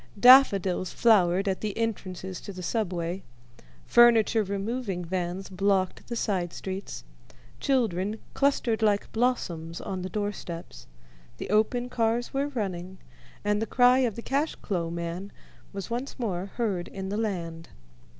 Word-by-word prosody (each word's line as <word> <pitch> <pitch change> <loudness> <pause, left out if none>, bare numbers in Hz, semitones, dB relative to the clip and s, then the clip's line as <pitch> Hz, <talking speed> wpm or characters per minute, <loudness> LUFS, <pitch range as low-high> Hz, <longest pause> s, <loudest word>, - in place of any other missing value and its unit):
Daffodils 200 -8 +6
flowered 195 -4 +4
at 190 -1 -1
the 210 -2 -3
entrances 190 -5 -3
to - - -7
the 185 -1 -8
Subway, 180 -3 -2 0.6
furniture 230 -2 +5
removing 200 -1 -3
vans 180 +2 -3
blocked 190 0 0
the 235 - -4
side 185 -7 -1
streets, 190 +1 -6 0.6
children 215 -6 0 0.2
clustered 265 -5 +1
like 205 -2 +1
blossoms 175 -9 -1
on 185 -1 -4
the 185 - -4
doorsteps, 170 - -5 0.5
the - - -5
open 230 +3 +2
cars 235 0 0
were 275 +1 0
running, 190 -8 -4 0.5
and 210 0 +1
the 225 - -1
cry 250 +2 +5
of 240 -6 +1
the 235 - -7
"cash 285 +4 0
clo'" 175 -5 -3
man 170 +3 -5 0.4
was 200 +3 -6
once 245 +4 -4
more 195 -7 -2
heard 200 -7 -1
in 190 0 -6
the 200 - -2
land. 170 -7 -3
200 Hz, 140 wpm, -27 LUFS, 180-230 Hz, 0.6 s, Daffodils